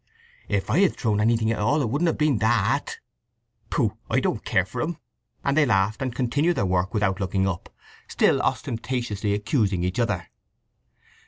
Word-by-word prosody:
"If 100 -2 -1
I - - +3
had 195 -2 +3
thrown 105 -3 0
anything 115 0 +2
at 115 - -2
all, 145 +8 +2
it - - +1
shouldn't 145 +10 0
have 165 - 0
been 150 -7 +2
that!" 110 -2 +1 0.7
"Pooh! - - 0
I - - +2
don't - - -1
care 95 - +1
for - - -5
him!" 165 +1 -2 0.5
And 140 - +2
they 155 - +5
laughed 105 0 +1
and 130 -2 -2
continued 145 +7 +1
their 100 - +1
work, 90 +1 0
without 95 -2 +1
looking 95 0 0
up, 95 -3 -4 0.4
still - - +2
ostentatiously 115 -4 -2
accusing 105 -4 0
each 90 +5 -2
other. 100 -7 -1
110 Hz, 175 wpm, -24 LUFS, 95-130 Hz, 0.7 s, they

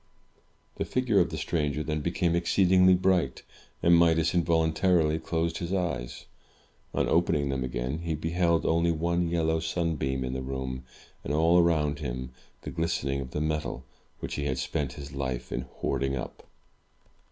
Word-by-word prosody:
The - - 0
figure 125 -6 +2
of - - +3
the - - -5
stranger 75 -2 -1
then 75 0 -2
became 85 +1 0
exceedingly 90 +1 +4
bright, 95 -1 +1 0.4
and 85 0 +6
Midas 80 -1 +4
involuntarily 80 -1 +2
closed 85 0 -2
his 85 +1 -4
eyes. 75 -11 -2 0.7
On - - 0
opening 75 -4 +2
them 65 -1 -1
again, 65 +4 -3
he 85 -1 -2
beheld 85 +1 +1
only 85 +1 +2
one 85 +1 0
yellow 80 -1 +1
sunbeam 80 -5 -1
in 65 0 -3
the 65 - -3
room, 65 -1 -4 0.4
and, - - -4
all 85 +3 +5
around 75 -4 +2
him, 65 -2 -4 0.3
the - - -5
glistening 70 -4 -1
of 65 - -6
the 75 - -3
metal 75 -5 -2 0.4
which - - -4
he 70 - -2
had 65 -2 -1
spent 65 +1 -2
his 70 0 -9
life 65 -3 -4
in 65 - -3
hoarding 70 0 0
up. 60 - -7
80 Hz, 160 wpm, -28 LUFS, 70-85 Hz, 0.7 s, and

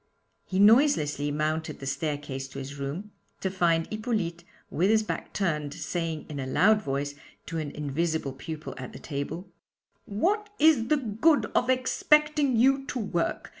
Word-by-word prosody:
He 185 - -3
noiselessly 205 - +4
mounted 155 +2 -2
the 135 - -7
staircase 140 -1 -3
to 135 - -11
his 140 +1 -7
room, 160 +10 -5 0.3
to 190 - -2
find 170 -3 +2
Hippolyte 215 -7 -2 0.3
with 185 +5 +2
his 220 0 +4
back - - -4
turned, 150 -7 -1
saying, 165 -3 -3
in 150 -2 -6
a 130 - -3
loud 210 +10 +4
voice, 140 -3 -2 0.3
to 165 -1 -4
an 155 -2 -3
invisible 150 0 -2
pupil 155 +3 -7
at 130 - -7
the - - -9
table: 160 +6 -5 0.5
'What 400 - 0
is 295 -7 +5
the 305 - +3
good 265 +5 +2
of 245 - +2
expecting 290 +2 +3
you 270 +3 +4
to - - -3
work? 195 -7 -2
170 Hz, 160 wpm, -27 LUFS, 145-225 Hz, 0.5 s, is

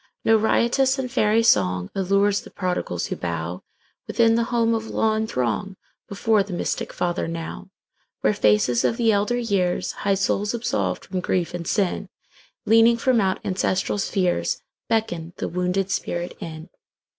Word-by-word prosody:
No 225 - +5
riotous 235 +5 +2
and 255 -2 -3
fairy 215 +1 +3
songAllures 190 - +2
the - - -12
prodigals 180 - -2
who - - -3
bowWithin 85 - -2
the 230 0 +1
home 230 -1 +1
of 225 0 -2
law, 220 0 +1
and 220 0 -1
throngBefore 195 - -1
the 195 - -8
mystic 175 - -2
Father 175 -1 -2
now, 165 - -6 0.5
Where - - +3
faces 105 +3 +3
of 230 - +1
the 230 -2 +3
elder 210 +4 +1
years, 200 -7 0
High 200 -1 0
souls 200 +3 0
absolved 100 - -2
from 185 -1 -3
grief 180 -1 -1
and 170 -2 -5
sin, 200 -1 0 0.6
Leaning 225 +2 +5
from 240 -1 +2
out 190 -1 0
ancestral 190 +1 0
spheresBeckon 180 -1 -2
the - - -3
wounded 180 +2 -1
spirit 175 +1 -3
in. 160 +1 -8
195 Hz, 145 wpm, -23 LUFS, 175-225 Hz, 0.6 s, No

